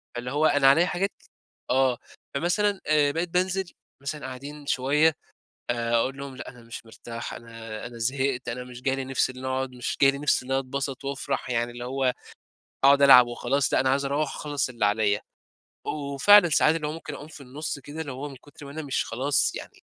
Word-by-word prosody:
فاللي 125 +1 -4
هو 150 +2 +2
أنا 145 -3 +4
عليَّا 160 +6 +5
حاجات 185 +2 -1 0.6
آه، 130 -1 +3 0.4
فمثلًا 190 +6 +1
آآ 150 -2 +4
بقيت 165 +3 -2
بانزل 185 +1 0 0.3
مثلًا 145 0 -5
قاعدين 140 +3 -8
شوية 145 +4 +3 0.6
آآ، 120 -1 -1
أقول 130 +4 +1
لهم: 140 -2 -7
"لأ - - -8
أنا 125 -2 -12
مش 115 0 -9
مرتاح 115 +1 -7
أنا 115 -2 -8
أنا 120 0 -9
زهقت 130 +1 -1
أنا 125 +1 -4
مش 125 0 -11
جاي 135 0 +1
لي 135 - -3
نفس 130 0 0
إن 130 0 -9
أقعد 130 0 -1
مش 125 -1 -4
جاي 135 - +8
لي 140 - -6
نفس 145 -2 +2
إن 130 - -10
أنا 135 - +2
اتبسَط 135 0 -4
وأفرَح 140 -2 -3
يعني 120 0 0
اللي 120 0 -7
هو 130 0 0 0.7
هاقعد 140 +1 +6
ألعب 125 -3 +9
وخلاص 130 +3 0
لأ، - - +4
أنا 130 - +2
عاوز 140 +1 +1
أروَّح 140 +1 -1
أخلَّص 145 -3 -2
اللي 120 -4 -1
عليَّا،" 105 0 +2 0.7
وفعلًا 155 +7 +5
ساعات 155 +1 +4
اللي 150 -2 -2
هو - - -2
ممكن 165 - -7
أقوم 145 - -9
في 155 - -12
النُصّ 140 +3 -5
كده 145 +4 -7
اللي 145 - -5
هو 135 +3 -6
من 135 - -10
كُتر 145 +2 -14
ما 140 - -9
أنا 160 - -5
مش 135 - -1
خلاص 135 +5 +1
يعني، - - -9
135 Hz, 210 wpm, -26 LUFS, 125-145 Hz, 0.7 s, ألعب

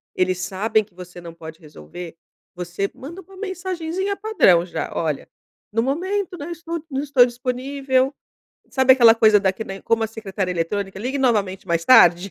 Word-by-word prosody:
eles 185 0 0
sabem 215 +4 0
que 200 -3 -26
você 180 0 -11
não 170 -1 -10
pode 160 0 -11
resolver, 160 - -11 0.4
você 180 +3 -3
manda 335 +8 -9
uma 385 +2 -17
mensagenzinha 375 -1 -3
padrão 390 - +3
já, 175 - -5
olha: 155 -4 -2 0.5
"No 225 - +1
momento, 360 +7 -2
né, 290 - -7
eu - - -6
estou 335 -1 -5
não 270 -1 -2
estou 275 -4 +5
disponível", 260 +2 -1 0.6
sabe 260 -1 +5
aquela 235 -3 +7
coisa 215 -2 +5
da 190 -1 +1
que 220 +4 -7
nem 195 -1 -8
como 230 0 0
a 220 - +1
secretária 200 -4 -4
eletrônica: 195 +3 -3
"Ligue 260 +6 -3
novamente 200 -7 0
mais 170 -1 -1
tarde", 180 -6 +6
225 Hz, 175 wpm, -21 LUFS, 185-280 Hz, 0.6 s, aquela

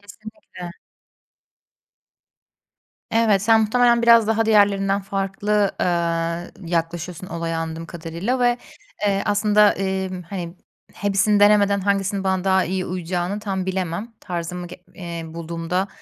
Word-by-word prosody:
Kesinlikle. 205 -3 -11 2.4
Evet, 220 -4 +3
sen 225 +1 +5
muhtemelen 235 +2 +3
biraz 230 -2 +6
daha 225 0 +1
diğerlerinden 200 -2 +3
farklı, 195 +1 0
eee, 170 +1 -2
yaklaşıyorsun 170 +1 -3
olaya 165 -1 -3
anladığım 165 0 -5
kadarıyla 170 +10 -3
ve, 245 0 +3 0.5
eee, 195 -1 +1
aslında, 210 0 +4
eee, 190 0 -2 0.2
hani, 175 -2 -6 0.4
hepsini 205 +1 +1
denemeden 205 -1 +5
hangisinin 195 0 0
bana 190 -1 0
daha 190 -1 +3
iyi 185 0 -2
uyacağını 180 +2 -3
tam 190 -3 -3
bilemem. 190 +4 -3
Tarzımı 175 0 -5
g 175 - -10 0.2
eee, 170 -2 -6
bulduğumda, 170 +3 -3
190 Hz, 115 wpm, -22 LUFS, 175-205 Hz, 2.4 s, biraz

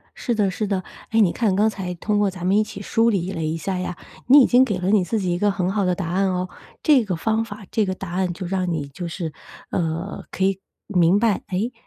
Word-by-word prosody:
是 240 - -2
的 205 -3 +2
是 210 +3 -2
的。 190 -2 -1 0.3
哎， 225 - +2
你 195 -6 +5
看 215 -5 +1
刚 210 +3 +3
才 190 -4 -5
通 205 +4 0
过 205 -1 +3
咱 180 -2 -7
们 190 +2 +3
一 215 - +4
起 210 -2 -8
梳 225 +3 +2
理 190 -4 -1
了 165 -4 -3
一 155 +1 -1
下 185 +2 -3
呀， 180 -1 -4 0.3
你 280 +3 +9
已 - - +6
经 250 +1 +5
给 210 -7 -1
了 180 +1 -1
你 205 -2 +4
自 220 +5 -1
己 185 -3 -1
一 - - -1
个 205 +1 +3
很 185 -1 -1
好 200 -1 0
的 180 -1 +1
答 175 -2 -4
案 190 +2 +1
哦。 180 0 -2 0.3
这 285 -6 +5
个 185 -3 -1
方 220 +6 0
法、 215 -2 -9
这 220 - +2
个 190 -1 -2
答 190 -2 -7
案 180 0 0
就 185 +2 -6
让 185 -1 -1
你 155 -4 -2
就 170 +6 -6
是， 165 -2 -5 0.4
呃， 170 +3 -2
可 190 - -2
以 195 0 +1 0.3
明 180 0 +3
白， 220 -3 +2
哎， 200 +5 -1
195 Hz, 285 characters per minute, -22 LUFS, 180-210 Hz, 0.4 s, 你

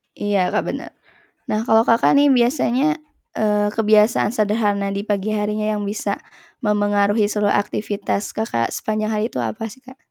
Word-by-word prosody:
Iya, 205 -1 -1 0.2
Kak, - - +2
bener. - - -7 0.5
Nah 215 +1 -1
kalau, 225 -1 +3
Kakak, 230 +4 +4
nih 290 - +5
biasanya, 260 +5 +2 0.4
eee, 210 -1 +1
kebiasaan 215 +1 +3
sederhana 205 -2 0
di 200 +2 -4
pagi 205 0 -1
harinya 210 0 -1 0.2
yang 205 - -4
bisa 205 +2 -3 0.5
mempengaruhi 205 0 +2
seluruh 210 -1 +1
aktivitas 205 0 -2
Kakak 115 - -1
sepanjang 215 0 -2
hari 210 0 0
itu - - -5
apa 225 -1 -3
sih, 260 - -13
Kak? 260 +1 -13
210 Hz, 155 wpm, -20 LUFS, 205-225 Hz, 0.5 s, nih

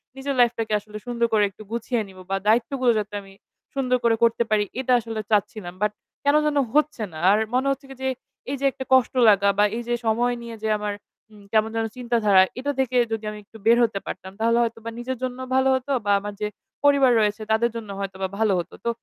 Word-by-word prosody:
নিজের 270 0 -3
লাইফ 240 -1 +6
টাকে 220 -1 -1
আসলে 210 +1 -10
সুন্দর 235 -1 +1
করে 210 - +4
একটু 205 +2 -13
গুছিয়ে 235 0 -1
নিব, 190 -1 -15
বা - - +2
দায়িত্বগুলো 240 +3 +3
যাতে 210 0 -6
আমি 195 0 -15 0.4
সুন্দর 255 -2 +1
করে 230 -1 +4
করতে 235 0 +3
পারি 210 -1 +3 0.2
এটা 255 -1 +1
আসলে 225 -1 -5
চাচ্ছিলাম। 205 -3 0
বাট 210 0 +2 0.3
কেন 285 +1 +3
যেন 295 -1 +1 0.2
হচ্ছে 300 -6 +1
না। 155 - -7
আর 210 - +4
মনে 260 +2 +1
হচ্ছে 275 +1 -4
কি 270 - -9
যে, 265 - +1 0.4
এই - - -1
যে 280 - -1
একটা 265 - -7
কষ্ট 260 -1 +4 0.2
লাগা 200 -1 +4
বা 205 - +5
এই - - -3
যে 240 - +2
সময় 240 +2 +2
নিয়ে 230 -1 -7
যে 220 - 0
আমার, 210 0 -3 0.4
উম 210 -1 -16
কেমন 220 0 +3
যেন 225 0 0
চিন্তাধারা 230 -6 +4 0.2
এটা 285 +2 -1
থেকে 255 -1 +1
যদি 220 -1 -2
আমি 210 - -8
একটু 215 +2 -15
বের 235 +1 +6
হতে 215 -4 0
পারতাম, 190 - -7
তাহলে 230 +1 +2
হয়তো 230 0 -3
বা - - -2
নিজের 255 +1 -4
জন্য 255 0 -3 0.2
ভালো 265 0 +4
হতো 260 +2 -3
বা 205 - +2
আমার 205 0 -6
যে 210 - 0 0.4
পরিবার 280 -3 +5
রয়েছে, 210 +1 +1
তাদের 235 +2 +3
জন্য 225 -3 -6
হয়তো 195 -1 -5
বা - - +1
ভালো 220 -3 +3
হত। 170 - -6
তো - - +2
230 Hz, 230 wpm, -24 LUFS, 210-255 Hz, 0.4 s, লাইফ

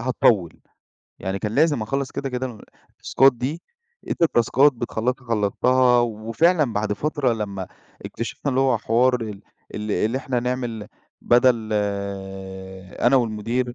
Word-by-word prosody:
هاطوّل، 115 -8 +2 0.7
يعني 95 +1 -3
كان 105 +1 -3
لازم 145 -6 +3
اخلّص 135 +5 -2
كده، 140 - -4
كده 130 0 -3
ال 115 -5 -10 0.3
التاسكات 135 +1 +3
دي 140 +8 -4 0.5
أنت - - -2
التاسكات 140 -1 +4
بتخلّصها 125 +1 -3
خلّصتها، 125 +4 +3
وفعلًا 120 +7 +1
بعد 105 0 -1
فترة 145 +2 0
لما 100 -4 -4 0.4
إكتشِفنا 115 +5 -4
اللي 130 0 +1
هو 130 -4 +2
حوار 120 +3 +2
ال 105 -3 -6 0.3
ال 105 0 -4
اللي 110 +5 0
إحنا 130 -2 -2
نعمل 120 -3 -3 0.3
بدل 120 -2 +3 1.3
أنا 120 +3 +4
والمدير 120 +1 -1
120 Hz, 130 wpm, -23 LUFS, 110-130 Hz, 1.3 s, التاسكات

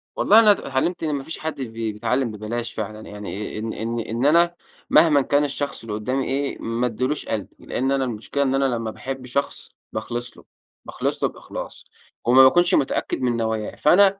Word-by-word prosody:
والله 215 +3 +6
أنا 215 -2 +7
إتعلمت 165 -1 -1
إن 155 -2 0
ما 140 - -4
فيش 160 - -7
حد 160 0 -3
بي 115 -3 -3
بيتعلم 120 +3 0
ببلاش 110 +3 -4
فعلًا، 110 0 -5
يعني 105 0 -6
إن 110 +1 -3
إن 115 +2 -3
إن 115 +3 -2
أنا 170 +3 +4 0.3
مهمًا 150 -2 +6
كان 145 +2 +2
الشخص 140 0 -3
اللي 115 -2 -6
قدّامي 125 +6 -1
إيه، 140 +1 -2
ما 115 +2 -1
أديلوش 130 +6 -2
قلبي، 105 -3 -4
لأن 135 +2 -1
أنا 135 -1 +2
المشكلة 120 +4 -2
إن 135 -1 +1
أنا 135 0 +2
لمّا 115 -4 -1
باحب 130 +2 -6
شخص 140 +3 -3 0.2
باخلص 120 +2 -4
له، - - -15 0.4
باخلص - - -3
له - - +3
بإخلاص، - - -8 0.4
وما 130 +2 +7
باكونش 175 +7 +5
متأكّد 135 - +1
من 120 -2 +1
نواياه، 110 -2 -2
فأنا 195 +4 +5
130 Hz, 185 wpm, -23 LUFS, 115-145 Hz, 0.4 s, أنا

